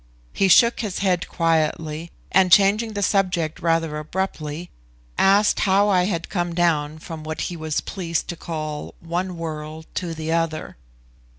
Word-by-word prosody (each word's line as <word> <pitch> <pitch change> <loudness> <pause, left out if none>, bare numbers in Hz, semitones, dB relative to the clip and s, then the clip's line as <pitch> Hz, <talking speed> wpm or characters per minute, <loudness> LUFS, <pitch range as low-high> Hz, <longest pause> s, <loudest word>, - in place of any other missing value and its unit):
He 195 - +2
shook 235 +6 +6
his 210 -5 -3
head 185 -3 +1
quietly, 160 -1 0 0.2
and, 185 -1 +4
changing 210 +3 +5
the 205 -1 -2
subject 180 -6 +1
rather 165 -2 0
abruptly, 160 -1 -4 0.4
asked 200 +2 +4
how 200 +1 +3
I 180 -2 +3
had 170 -4 -2
come 175 -3 -2
down 155 -3 +1
from 160 0 -8
what 155 0 -4
he 175 - -3
was 155 -2 -2
pleased 170 -4 -3
to 175 - -3
call 155 -2 -5
one 175 +2 -3
world 155 -1 -6 0.2
to 170 -2 -4
the 160 0 -4
other. 165 -1 -1
170 Hz, 155 wpm, -23 LUFS, 155-190 Hz, 0.4 s, shook